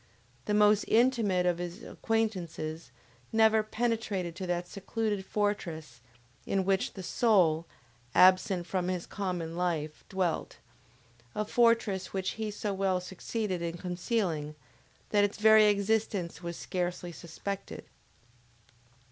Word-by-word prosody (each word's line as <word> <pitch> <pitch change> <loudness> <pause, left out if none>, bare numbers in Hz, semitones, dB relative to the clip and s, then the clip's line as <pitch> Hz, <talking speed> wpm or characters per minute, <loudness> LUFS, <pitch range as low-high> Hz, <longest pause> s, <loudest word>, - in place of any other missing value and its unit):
The 210 - +1
most 210 0 +5
intimate 225 -6 +3
of 175 -1 +1
his 175 +5 -6
acquaintances 175 - -2 0.4
never 220 0 +5
penetrated 215 -6 -2
to 185 - -4
that 175 0 -1
secluded 205 +1 -2
fortress 170 - -3 0.4
in 195 -1 0
which 195 0 +1
the 190 - -7
soul, 175 -6 +3 0.5
absent 185 0 +5
from 180 0 -1
his 180 -2 -2
common 180 -5 -4
life, 165 -4 -2
dwelt; 185 -4 -1 0.8
a 210 - -1
fortress 230 -5 +2
which 190 -1 -1
he 220 -1 -4
so 205 0 -3
well 190 -1 +1
succeeded 190 +1 -4
in 170 0 -3
concealing, 180 -4 -2 0.5
that 205 -1 +3
its 205 0 0
very 220 0 +7
existence 200 -4 0
was 170 -1 -5
scarcely 180 -1 -3
suspected. 180 +4 -6
190 Hz, 120 wpm, -30 LUFS, 175-210 Hz, 0.8 s, very